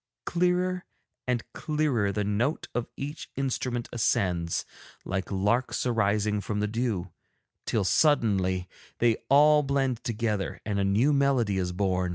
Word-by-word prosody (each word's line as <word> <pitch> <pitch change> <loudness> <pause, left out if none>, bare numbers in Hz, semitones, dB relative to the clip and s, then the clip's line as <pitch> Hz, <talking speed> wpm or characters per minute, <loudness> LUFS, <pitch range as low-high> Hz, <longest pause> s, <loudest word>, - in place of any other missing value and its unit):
Clearer 180 +1 +1 0.4
and 125 -2 0
clearer 145 -10 0
the 105 +1 -1
note 105 +9 -1
of 120 -1 -2
each 145 +3 -6
instrument 125 -3 -2
ascends 90 -8 0 0.4
like 95 +1 -3
larks 105 +8 0
arising 105 -3 +1
from 105 +1 -3
the 105 - +1
dew, 105 -5 -2 0.6
till 110 - +1
suddenly 95 - +2 0.3
they 115 -2 +3
all 150 +2 +6
blend 135 -4 0
together 110 -4 -2
and 100 -2 -1
a - - +2
new 110 +10 +3
melody 130 -8 +2
is 90 -1 -1
born. 90 -1 0
115 Hz, 135 wpm, -27 LUFS, 100-135 Hz, 0.6 s, all